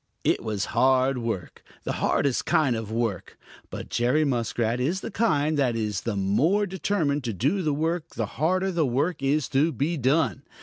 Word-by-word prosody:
It - - +2
was 105 -3 -2
hard 130 0 +3
work, 115 -6 -4 0.2
the - - -2
hardest 140 -3 0
kind 135 -6 +3
of 110 -1 -4
hard 110 +2 -4
work. 115 -6 -3 0.3
But - - -7
Jerry 125 +6 +2
Muskrat 120 -2 -1
is 165 +9 0
the - - -6
kind 155 -9 +1
that 125 -4 +2
is 105 -4 -2
the 115 -3 -3
more 145 - +2
determined 180 -7 -1
to 115 - -2
do 140 - 0
the 155 -4 0
work 165 +2 -1
the 115 - -1
harder 185 - 0
the 170 -3 +1
work 145 +6 -1
is 140 +1 +1
to 145 +4 +2
be 160 +3 -1
done. 135 +1 +1
135 Hz, 185 wpm, -25 LUFS, 115-160 Hz, 0.3 s, hard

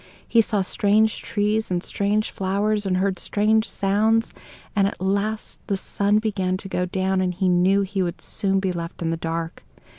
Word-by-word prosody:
He 230 - +5
saw 210 -2 0
strange 210 +3 +2
trees 210 +1 0
and 180 -1 -1
strange 210 +2 0
flowers, 200 +2 0
and 185 -1 +1
heard 190 -1 0
strange 220 +1 +1
sounds: 215 +3 +1 0.4
and 200 -1 +3
at - - -5
last 200 +3 -2
the 200 - 0
sun 200 +2 +1
began 195 -4 0
to 195 - -8
go 180 -1 -1
down, 190 +1 0
and 180 -1 -1
he 190 +1 0
knew 185 +2 +3
he 195 0 -2
would 175 -2 -2
soon 195 -1 0
be 190 -1 0
left 170 0 -5
in 165 - 0
the 165 - -1
dark. 165 0 -4
195 Hz, 185 wpm, -23 LUFS, 185-210 Hz, 0.4 s, He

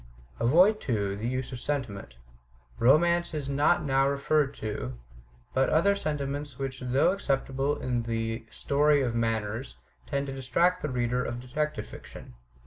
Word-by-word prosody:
Avoid, 180 - +5
too, 100 -6 -1
the 110 +3 -3
use 130 +1 -3
of 125 - -6
sentiment. 115 - -4 0.6
Romance 170 +6 +4
is 145 -3 -3
not 140 +1 +2
now 135 -1 +2
referred 140 0 +1
to; 65 - -5 0.6
but 135 0 +2
other 170 +6 +4
sentiments 145 -6 -3
which 135 -1 -4
though 125 +6 +2
acceptable 135 -5 -1
in 125 -2 -1
the 115 0 -3
"story 145 +2 +2
of 120 -3 -1
manners," 115 +1 -2 0.3
tend 140 -1 -1
to 135 - -5
distract 170 +8 +1
the 150 - -2
reader 125 0 0
of 120 - -4
detective 125 -2 -3
fiction. - - -11
135 Hz, 145 wpm, -28 LUFS, 120-150 Hz, 0.6 s, Avoid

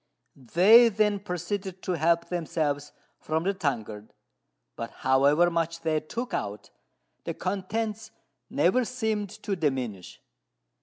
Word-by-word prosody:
They 190 - +6
then 210 -1 +1
proceeded 190 0 -4
to - - -2
help 170 0 +2
themselves 150 -4 -2 0.3
from 160 +1 -1
the 195 +2 +1
tankard; 110 - -4 0.6
but 115 0 -5 0.2
however 140 +6 +4
much 165 0 -1
they 155 -1 +1
took 235 +11 -6
out, 100 0 -4 0.5
the - - -4
contents 215 +3 -3 0.4
never 185 - +2
seemed 220 -4 -2
to 200 - -1
diminish. 130 - -3
170 Hz, 115 wpm, -27 LUFS, 145-205 Hz, 0.6 s, They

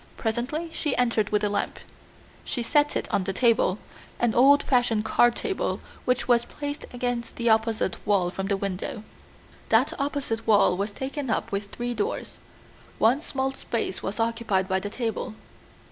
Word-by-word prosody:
Presently 250 +9 -2
she 295 -4 -1
entered 230 -4 +2
with 210 0 +1
a 210 - +2
lamp. 205 0 -2 0.7
She 240 - -2
set 295 +4 +2
it - - -1
on 195 - +2
the 195 - -1
table, 225 -3 +3 0.4
an 240 -2 +2
old 280 +4 +6
fashioned 240 -4 +2
card 240 +1 +4
table 400 -4 -2 0.3
which 250 0 +1
was 240 -1 +4
placed 290 +3 -6
against 245 -1 -3
the 235 -1 +2
opposite 220 -3 +1
wall 190 -4 +2
from 195 +1 -3
the 200 -1 +1
window. 195 +3 -4 0.7
That - - +4
opposite 280 -6 -2
wall 205 -4 +5
was 200 +3 -2
taken 265 +4 -4
up 220 - -1
with 200 0 -3
three 240 +2 -3
doors; 215 -3 -2
the - - -19 0.7
one 245 +6 +5
small 270 -3 -2
space 230 -7 -3
was 200 +4 -4
occupied 225 -4 0
by 190 0 +1
the 205 +2 -4
table. 225 -1 -3
230 Hz, 170 wpm, -26 LUFS, 205-255 Hz, 0.7 s, old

